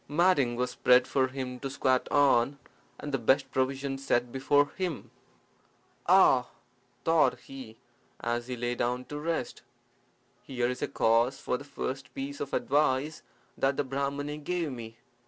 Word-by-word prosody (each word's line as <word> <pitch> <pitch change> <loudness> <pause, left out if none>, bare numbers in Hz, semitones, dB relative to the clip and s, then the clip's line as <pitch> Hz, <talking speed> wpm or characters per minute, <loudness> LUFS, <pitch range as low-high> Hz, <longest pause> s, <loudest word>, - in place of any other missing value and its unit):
Matting 145 -6 +3
was 125 +1 -1
spread 125 0 +4
for 130 -1 +2
him 130 -1 -5
to 135 - -4
squat 130 -2 +1
on, 140 -2 +3 0.4
and 150 - -6
the 135 - 0
best 135 +3 +2
provisions 135 +1 -1
set 120 -3 +1
before 145 +2 +2
him. 180 -5 -4 1.0
"Ah!" - - +5 0.6
thought 165 -1 +3
he, 130 -5 -10 0.4
as 120 +1 -2
he 125 -1 -4
lay 120 +1 -1
down 125 +1 -2
to 145 - -6
rest, 165 +2 -3 0.8
"here 125 -2 -2
is 125 0 -4
a - - 0
case 115 +4 +2
for - - -1
the 140 - -6
first 135 -2 -5
piece 140 +1 -5
of 140 - -4
advice 145 +2 +1 0.3
that 135 0 +1
the 145 - +1
Brahmani 140 +2 -3
gave 165 0 -2
me. 115 -2 -8
135 Hz, 155 wpm, -29 LUFS, 125-145 Hz, 1.0 s, Ah